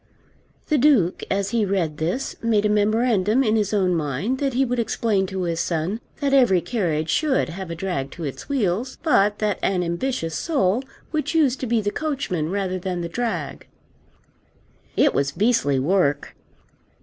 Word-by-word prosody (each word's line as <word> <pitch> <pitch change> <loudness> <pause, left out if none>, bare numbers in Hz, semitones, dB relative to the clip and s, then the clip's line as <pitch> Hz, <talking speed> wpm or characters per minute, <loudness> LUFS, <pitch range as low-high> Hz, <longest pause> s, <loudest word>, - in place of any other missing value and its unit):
The 305 -3 +3
Duke 240 - +3
as 195 0 -1
he 230 -2 +2
read 185 -6 -1
this 175 - -2
made 220 -2 +2
a - - +3
memorandum 215 +2 +2
in 220 -3 +2
his 210 -2 +1
own 190 -4 +2
mind 165 - -1
that 275 -3 -1
he 270 +1 +3
would 245 -1 -1
explain 215 -3 0
to 190 0 -3
his 170 -1 -1
son 170 +5 -1 0.2
that 280 -1 +1
every 245 -9 +5
carriage 165 -7 -1
should 295 - +1
have 185 +1 -6
a 170 - -4
drag 165 -6 -3
to 170 - -8
its 140 - -6
wheels, 240 -1 -1
but 210 -10 +3
that 210 -2 -1
an 185 -2 +1
ambitious 170 0 -2
soul 250 - +1 0.3
would 310 -4 -1
choose 310 -5 +2
to 260 - -4
be 230 -1 +2
the 205 0 -1
coachman 265 - -2
rather 190 -1 -2
than 180 -1 -3
the 170 - -4
drag. 190 - -3 1.3
It - - +4
was 140 0 0
beastly 195 - +2
work! 145 0 +1
200 Hz, 175 wpm, -23 LUFS, 170-245 Hz, 1.3 s, every